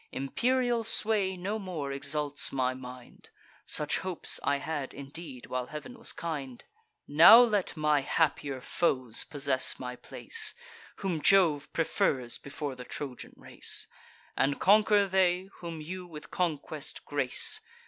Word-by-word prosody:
Imperial 240 Hz, -, 0 dB
sway 210 Hz, -4 st, +1 dB
no 200 Hz, +5 st, -3 dB
more 170 Hz, -8 st, -5 dB
exalts 145 Hz, +1 st, 0 dB
my 130 Hz, -1 st, 0 dB
mind; 125 Hz, -1 st, -11 dB, 0.4 s
(Such 150 Hz, -1 st, +1 dB
hopes 185 Hz, -4 st, -1 dB
I 140 Hz, -, +2 dB
had 145 Hz, -2 st, -4 dB
indeed, 140 Hz, -1 st, -9 dB
while 125 Hz, -1 st, -3 dB
Heav'n 230 Hz, -, -9 dB
was -, -, 0 dB
kind;) 140 Hz, -7 st, -6 dB, 0.4 s
Now 165 Hz, +10 st, +9 dB
let 210 Hz, -8 st, +1 dB
my 150 Hz, -1 st, +3 dB
happier 140 Hz, -2 st, 0 dB
foes 130 Hz, -6 st, 0 dB
possess 140 Hz, -3 st, 0 dB
my 125 Hz, -1 st, -6 dB
place, 450 Hz, -, -1 dB, 0.4 s
Whom 180 Hz, -6 st, -3 dB
Jove 165 Hz, -7 st, +4 dB
prefers 130 Hz, -6 st, 0 dB
before 140 Hz, 0 st, -5 dB
the 125 Hz, -1 st, -9 dB
Trojan 130 Hz, 0 st, -7 dB
race; -, -, -4 dB, 0.5 s
And 140 Hz, +2 st, +1 dB
conquer 210 Hz, +1 st, +5 dB
they, 185 Hz, -1 st, +1 dB
whom 165 Hz, -2 st, -6 dB
you 180 Hz, +3 st, -7 dB
with 155 Hz, -3 st, -11 dB
conquest 155 Hz, -3 st, -3 dB
grace. 140 Hz, -3 st, +1 dB
150 Hz, 130 wpm, -29 LUFS, 135-185 Hz, 0.5 s, Now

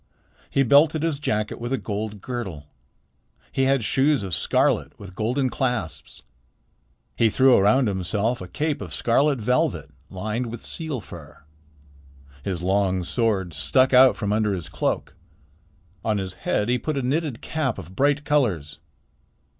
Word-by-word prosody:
He 135 Hz, -, +2 dB
belted 150 Hz, +4 st, +4 dB
his 160 Hz, -4 st, -1 dB
jacket 105 Hz, -7 st, -2 dB
with 120 Hz, +1 st, -4 dB
a 135 Hz, -, +1 dB
gold 105 Hz, -2 st, -5 dB
girdle. 95 Hz, -, -5 dB, 0.9 s
He 135 Hz, -, +1 dB
had 135 Hz, -2 st, +2 dB
shoes 135 Hz, +3 st, +2 dB
of 95 Hz, -3 st, -3 dB
scarlet -, -, +1 dB
with 100 Hz, -2 st, -10 dB
golden 125 Hz, +6 st, -1 dB
clasps. 125 Hz, -, -3 dB, 0.9 s
He 115 Hz, -, +3 dB
threw 130 Hz, +3 st, +5 dB
around 110 Hz, +6 st, +4 dB
himself 100 Hz, +5 st, -1 dB
a 90 Hz, -, -7 dB
cape 145 Hz, -, -2 dB
of -, -, -5 dB
scarlet 140 Hz, +4 st, +2 dB
velvet 110 Hz, -, 0 dB, 0.2 s
lined 110 Hz, +6 st, -3 dB
with 115 Hz, 0 st, -8 dB
seal 155 Hz, -7 st, -5 dB
fur. 80 Hz, -7 st, -12 dB, 1.0 s
His 90 Hz, -3 st, -3 dB
long 95 Hz, -1 st, +1 dB
sword 100 Hz, -5 st, -1 dB
stuck 75 Hz, -, +2 dB
out 130 Hz, +1 st, +7 dB
from 105 Hz, -2 st, -1 dB
under 105 Hz, -1 st, +1 dB
his 85 Hz, -4 st, -6 dB
cloak. -, -, -2 dB, 0.9 s
On 110 Hz, -2 st, 0 dB
his 95 Hz, -2 st, -4 dB
head 95 Hz, +3 st, -1 dB
he 125 Hz, +1 st, +1 dB
put 155 Hz, +2 st, -3 dB
a 135 Hz, -, -1 dB
knitted 140 Hz, -1 st, -1 dB
cap 150 Hz, -7 st, -2 dB
of 90 Hz, +4 st, -10 dB
bright 145 Hz, +3 st, +2 dB
colors. 90 Hz, -, 0 dB
115 Hz, 150 wpm, -24 LUFS, 95-135 Hz, 1.0 s, out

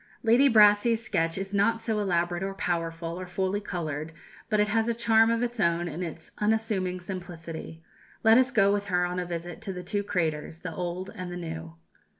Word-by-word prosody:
Lady 240 Hz, +5 st, +5 dB
Brassey's 220 Hz, +1 st, +5 dB
sketch 165 Hz, -6 st, 0 dB
is 195 Hz, +1 st, -5 dB
not 215 Hz, +3 st, +2 dB
so 225 Hz, -1 st, -1 dB
elaborate 175 Hz, -3 st, 0 dB
or 195 Hz, 0 st, -3 dB
powerful 165 Hz, -1 st, -2 dB
or 185 Hz, -, -6 dB
fully 190 Hz, +2 st, -1 dB
coloured, 160 Hz, -5 st, -4 dB, 0.4 s
but 215 Hz, -, +2 dB
it 210 Hz, 0 st, +3 dB
has 225 Hz, +1 st, +1 dB
a 235 Hz, -, 0 dB
charm 225 Hz, -1 st, +4 dB
of 230 Hz, +1 st, +1 dB
its 240 Hz, -1 st, -3 dB
own 170 Hz, -1 st, +2 dB
in 165 Hz, +2 st, -5 dB
its 165 Hz, -2 st, -6 dB
unassuming 210 Hz, -4 st, 0 dB
simplicity. 170 Hz, -3 st, -7 dB, 0.4 s
Let 225 Hz, +2 st, +7 dB
us 260 Hz, 0 st, +3 dB
go 200 Hz, -6 st, +4 dB
with 205 Hz, 0 st, -1 dB
her 180 Hz, -2 st, +1 dB
on 180 Hz, +1 st, -2 dB
a 180 Hz, -, -3 dB
visit 175 Hz, +3 st, -5 dB
to 200 Hz, -3 st, -4 dB
the 180 Hz, 0 st, -6 dB
two 205 Hz, +3 st, -1 dB
craters, 160 Hz, -5 st, -2 dB
the 180 Hz, -2 st, -5 dB
old 180 Hz, +2 st, -4 dB
and 185 Hz, -1 st, -6 dB
the 175 Hz, -, -5 dB
new. 165 Hz, -1 st, -6 dB
185 Hz, 200 wpm, -27 LUFS, 170-215 Hz, 0.4 s, Let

